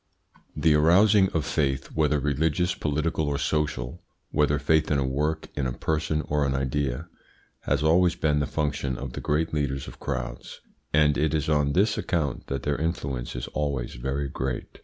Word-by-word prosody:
The 80 Hz, -2 st, +3 dB
arousing 95 Hz, +6 st, +5 dB
of 80 Hz, -6 st, -1 dB
faith 70 Hz, -3 st, -1 dB
whether 75 Hz, -1 st, +2 dB
religious, 80 Hz, +5 st, +1 dB
political, 75 Hz, +1 st, -1 dB
or 70 Hz, -1 st, 0 dB
social, 70 Hz, -4 st, -1 dB, 0.3 s
whether 75 Hz, -1 st, +2 dB
faith 75 Hz, +2 st, +2 dB
in 75 Hz, -, +2 dB
a 70 Hz, -, +1 dB
work, 75 Hz, +4 st, -1 dB
in 70 Hz, -2 st, -1 dB
a 65 Hz, -, -3 dB
person, 80 Hz, +1 st, -1 dB
or 75 Hz, 0 st, 0 dB
an 70 Hz, -1 st, 0 dB
idea 70 Hz, +2 st, -1 dB, 0.6 s
has 70 Hz, +1 st, +1 dB
always 85 Hz, +3 st, +4 dB
been 75 Hz, -2 st, +1 dB
the 70 Hz, -, 0 dB
function 70 Hz, -4 st, -1 dB
of 65 Hz, -2 st, -6 dB
the -, -, -5 dB
great 80 Hz, +2 st, 0 dB
leaders 70 Hz, -3 st, -1 dB
of -, -, -11 dB
crowds, -, -, -5 dB, 0.3 s
and 75 Hz, -1 st, +3 dB
it 80 Hz, +1 st, +1 dB
is 75 Hz, 0 st, -1 dB
on 75 Hz, -2 st, +2 dB
this 105 Hz, +5 st, +2 dB
account 75 Hz, -7 st, -2 dB
that 70 Hz, -2 st, -3 dB
their 75 Hz, -1 st, 0 dB
influence 70 Hz, -8 st, -3 dB
is 60 Hz, -, -3 dB
always 70 Hz, -5 st, -2 dB
very 65 Hz, +4 st, -2 dB
great. 65 Hz, -1 st, -4 dB
75 Hz, 180 wpm, -26 LUFS, 70-80 Hz, 0.6 s, arousing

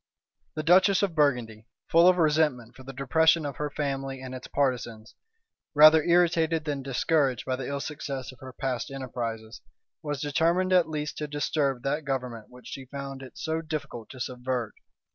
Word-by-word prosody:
The 155 Hz, -, -3 dB
duchess 185 Hz, +4 st, +5 dB
of 195 Hz, -4 st, 0 dB
Burgundy, 125 Hz, -8 st, 0 dB, 0.2 s
full 170 Hz, +2 st, +6 dB
of 185 Hz, 0 st, +5 dB
resentment 150 Hz, -7 st, +1 dB
for -, -, -13 dB
the 130 Hz, +1 st, -9 dB
depression 160 Hz, +4 st, +3 dB
of 140 Hz, -3 st, -5 dB
her 150 Hz, 0 st, -2 dB
family 135 Hz, -2 st, -3 dB
and 130 Hz, 0 st, -8 dB
its 130 Hz, -, -8 dB
partisans, 120 Hz, -5 st, -2 dB, 0.6 s
rather 155 Hz, +1 st, +8 dB
irritated 165 Hz, -2 st, +2 dB
than 145 Hz, -3 st, -2 dB
discouraged 135 Hz, 0 st, 0 dB
by 130 Hz, -, -1 dB
the 130 Hz, -1 st, -5 dB
ill 140 Hz, 0 st, -3 dB
success 140 Hz, -4 st, -5 dB
of 130 Hz, -, -18 dB
her 130 Hz, -1 st, -9 dB
past 125 Hz, -2 st, -3 dB
enterprises, 120 Hz, -4 st, -5 dB, 0.4 s
was 145 Hz, -3 st, -4 dB
determined 165 Hz, +6 st, +1 dB
at 175 Hz, -3 st, +4 dB
least 150 Hz, -1 st, -4 dB
to 150 Hz, -, -3 dB
disturb 145 Hz, -3 st, -1 dB
that 145 Hz, +3 st, -1 dB
government 125 Hz, -5 st, -4 dB
which 125 Hz, 0 st, -16 dB
she 135 Hz, -, -8 dB
found 140 Hz, 0 st, -7 dB
it 130 Hz, -, -12 dB
so 160 Hz, 0 st, -2 dB
difficult 145 Hz, -8 st, -6 dB
to 130 Hz, -, -11 dB
subvert. 125 Hz, -2 st, -3 dB
140 Hz, 175 wpm, -27 LUFS, 130-155 Hz, 0.6 s, rather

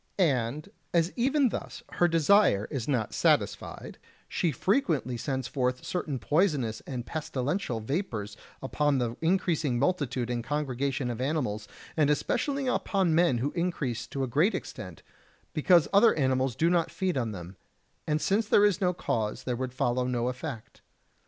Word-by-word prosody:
And 145 Hz, -, +1 dB, 0.3 s
as 170 Hz, +1 st, +2 dB
even 265 Hz, +2 st, +2 dB
thus 240 Hz, -, -6 dB
her 175 Hz, -, +3 dB
desire 165 Hz, -, +4 dB
is 135 Hz, -6 st, -3 dB
not 125 Hz, -7 st, -1 dB
satisfied, -, -, 0 dB, 0.3 s
she 170 Hz, -, 0 dB
frequently 155 Hz, -, 0 dB
sends 130 Hz, +1 st, -3 dB
forth 125 Hz, -1 st, -1 dB
certain 155 Hz, -6 st, -2 dB
poisonous 145 Hz, -, +1 dB
and 125 Hz, -3 st, -4 dB
pestilential 145 Hz, -, -2 dB
vapours 110 Hz, -, -3 dB, 0.3 s
upon 145 Hz, +1 st, +1 dB
the 120 Hz, -2 st, -1 dB
increasing 160 Hz, -6 st, +1 dB
multitude 130 Hz, -5 st, 0 dB
and 120 Hz, -1 st, -2 dB
congregation 135 Hz, -2 st, -2 dB
of 120 Hz, +1 st, -5 dB
animals, 125 Hz, -8 st, -1 dB, 0.3 s
and 150 Hz, -3 st, +3 dB
especially 265 Hz, -, 0 dB
upon 195 Hz, -8 st, +1 dB
men 165 Hz, -6 st, +3 dB
who 135 Hz, +5 st, -1 dB
increase 165 Hz, -9 st, -2 dB
to 135 Hz, -, -3 dB
a -, -, -1 dB
great 155 Hz, -, +2 dB
extent, -, -, -7 dB, 0.5 s
because 170 Hz, +1 st, +4 dB
other 210 Hz, +4 st, +6 dB
animals 130 Hz, -3 st, +1 dB
do 165 Hz, -, +2 dB
not 170 Hz, -2 st, +2 dB
feed 185 Hz, -2 st, -2 dB
on 120 Hz, -4 st, -1 dB
them; 90 Hz, -1 st, -8 dB, 0.5 s
and 150 Hz, 0 st, +1 dB
since 205 Hz, +2 st, +1 dB
there 205 Hz, -1 st, +5 dB
is 205 Hz, -1 st, +2 dB
no 180 Hz, -1 st, +2 dB
cause, 110 Hz, -10 st, -2 dB
there 125 Hz, -, -2 dB
would 130 Hz, +1 st, -3 dB
follow 125 Hz, 0 st, 0 dB
no 125 Hz, -1 st, 0 dB
effect. 125 Hz, -3 st, -7 dB
140 Hz, 155 wpm, -28 LUFS, 125-175 Hz, 0.5 s, other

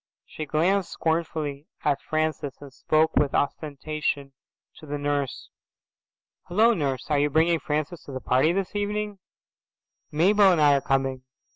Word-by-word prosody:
She 155 Hz, -, -7 dB
glanced 175 Hz, +5 st, +1 dB
scornfully 160 Hz, -3 st, -2 dB, 0.2 s
at 145 Hz, -2 st, +1 dB
Francis 155 Hz, -3 st, -2 dB
and 140 Hz, -2 st, -12 dB
spoke 155 Hz, +4 st, +1 dB
with 145 Hz, -2 st, +2 dB
ostentation 145 Hz, -1 st, -2 dB, 0.4 s
to 155 Hz, -, -13 dB
the 145 Hz, +1 st, -3 dB
nurse. 145 Hz, -2 st, -2 dB, 1.0 s
"Hello, 220 Hz, +6 st, +4 dB
Nurse. 140 Hz, -, -2 dB
Are 145 Hz, -, +3 dB
you 145 Hz, +1 st, +2 dB
bringing 160 Hz, +3 st, +3 dB
Francis 155 Hz, +3 st, -3 dB
to -, -, -9 dB
the 130 Hz, -, -4 dB
party 130 Hz, +5 st, +2 dB
this 195 Hz, +2 st, -2 dB
evening? 205 Hz, 0 st, -2 dB, 0.9 s
Mabel 195 Hz, +5 st, +5 dB
and 175 Hz, -, +2 dB
I 145 Hz, -1 st, +6 dB
are 140 Hz, -, +2 dB
coming." 135 Hz, -1 st, 0 dB
155 Hz, 145 wpm, -25 LUFS, 140-170 Hz, 1.0 s, I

